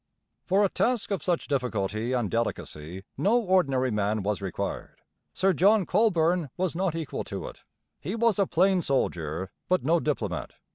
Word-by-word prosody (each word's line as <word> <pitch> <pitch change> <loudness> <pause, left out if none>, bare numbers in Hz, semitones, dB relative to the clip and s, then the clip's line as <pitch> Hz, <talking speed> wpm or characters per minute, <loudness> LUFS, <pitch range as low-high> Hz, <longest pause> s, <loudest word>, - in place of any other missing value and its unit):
For 195 +2 +3
a 200 - +3
task 240 0 0
of 195 - -1
such 175 -2 -1
difficulty 115 -4 -1
and 120 -5 0
delicacy 95 -6 -3 0.2
no 225 +6 +4
ordinary 140 - +2
man 105 0 0
was 100 0 -1
required. 95 -3 -4 0.4
Sir 190 +1 +2
John 200 +4 +4
Colborne 175 -6 +2
was 185 -2 -1
not 180 -2 0
equal 160 -4 -4
to - - -5
it; - - -11 0.4
he 185 +8 -4
was 230 -2 +2
a 195 - +3
plain 185 +2 +3
soldier, 90 - -1 0.2
but 185 0 +2
no 165 +4 +3
diplomat. 105 - -2
160 Hz, 160 wpm, -27 LUFS, -, 0.4 s, no